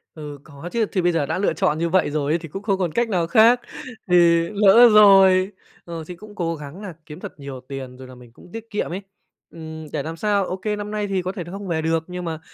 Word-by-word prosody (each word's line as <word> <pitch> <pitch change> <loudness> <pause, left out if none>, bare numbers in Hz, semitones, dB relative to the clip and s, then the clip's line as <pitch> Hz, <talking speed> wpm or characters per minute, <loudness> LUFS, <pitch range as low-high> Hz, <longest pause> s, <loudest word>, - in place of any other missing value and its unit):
Ừ, 145 -2 -8
có 145 +4 -10
chứ. 230 -2 +1
Thì 185 - 0
bây 175 0 +2
giờ 165 -4 0
đã - - -2
lựa 200 - +1
chọn 155 -6 0
như 170 +1 -1
vậy 185 -3 +2
rồi 145 0 -1
ấy, 170 - +1
thì 165 - -9
cũng 195 +5 -7
không 195 -3 0
còn 175 -4 -1
cách 235 +3 0
nào 175 -4 0
khác, 230 +6 +5 0.5
thì 180 - +3 0.4
lỡ 210 +4 +7
rồi. 195 -2 +6 0.3
Ờ, 165 -2 -6
thì 180 - -7
cũng 210 +3 -14
cố 165 -2 -2
gắng 150 +6 -10
nà 190 -5 -7
kiếm 150 -1 -10
thật - - -10
nhiều 135 -2 -8
tiền 130 -2 -7
rồi 130 -1 -11
là 130 - -12
mình 120 -2 -16
cũng 175 - -17
tiết 225 0 -8
kiệm 210 - -3
ấy. 195 - -4 0.5
Ừm, 160 -1 -9
để 145 - -2
làm 165 +1 -6
sao, 200 0 +1
OK, 185 +3 -6
năm 210 0 -6
nay 210 -1 -2
thì 190 -2 -1
có 185 +1 -3
thể 185 -3 -6
là 175 - -11
không 200 0 -7
về 160 -2 -1
được 160 0 0
nhưng 180 0 -6
mà, 160 -1 -4
175 Hz, 270 wpm, -22 LUFS, 155-200 Hz, 0.5 s, lỡ